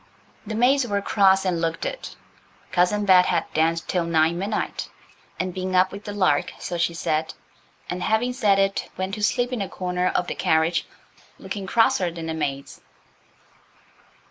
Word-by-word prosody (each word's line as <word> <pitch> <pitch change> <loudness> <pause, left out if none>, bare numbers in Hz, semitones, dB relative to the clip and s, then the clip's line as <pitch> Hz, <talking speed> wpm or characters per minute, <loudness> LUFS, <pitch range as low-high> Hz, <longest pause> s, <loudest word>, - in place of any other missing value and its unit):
The 220 - -3
maids 250 +3 +3
were 200 -2 0
cross 195 -1 +3
and 175 -3 0
looked 165 0 -2
it. - - -5 0.6
Cousin 205 +4 +2
Bet 185 -2 +6
had 170 -2 +1
danced 165 +1 +1
till 180 -2 0
nigh 160 -1 +2
midnight, 195 +5 -3 0.5
and 185 -1 -2
been 185 0 -3
up 185 +1 +4
with 200 +1 -9
the 205 - -5
lark, 185 -8 +1
so 175 - -5
she 170 0 0
said. 160 -2 -1 0.5
And, 180 0 -4
having 220 +6 +1
said 210 -6 +3
it, 195 0 0
went 190 +1 -3
to 210 - -4
sleep 245 +4 +1
in 240 - -2
a 195 - -3
corner 180 0 -2
of 180 - 0
the - - -4
carriage 160 +2 +1 0.5
looking 200 -3 -6
crosser 190 -4 +3
than 165 -1 -7
the 160 - -3
maids. 140 -3 -4
185 Hz, 170 wpm, -23 LUFS, 170-205 Hz, 0.6 s, Bet